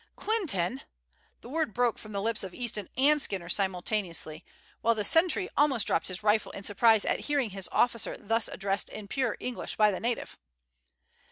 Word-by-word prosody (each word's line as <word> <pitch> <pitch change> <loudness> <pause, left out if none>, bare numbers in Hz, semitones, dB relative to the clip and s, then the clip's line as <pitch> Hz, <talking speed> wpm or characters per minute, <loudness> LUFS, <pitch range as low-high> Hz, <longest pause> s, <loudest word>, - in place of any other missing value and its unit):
"Clinton!" 270 - 0 0.6
The 235 - -11
word 310 -6 -2
broke 245 -2 +1
from 215 - -11
the 200 -1 -3
lips 225 -1 +2
of 190 -2 -7
Easton 225 -5 -3
and 295 +3 +4
Skinner 185 -7 -2
simultaneously, 180 -4 -1 0.4
while 230 0 +3
the 210 - -2
sentry 350 - +4
almost 275 -6 +3
dropped - - +1
his 185 +2 -1
rifle 210 0 +2
in 200 - -8
surprise 220 +2 +3
at - - 0
hearing 280 -7 0
his 195 -1 -4
officer 235 -2 +1
thus 225 +1 0
addressed 195 0 -2
in 210 -2 -8
pure 255 +1 -1
English 250 -2 -5
by 210 -1 +4
the 190 - -4
native. 235 0 -3
215 Hz, 175 wpm, -29 LUFS, 195-245 Hz, 0.6 s, and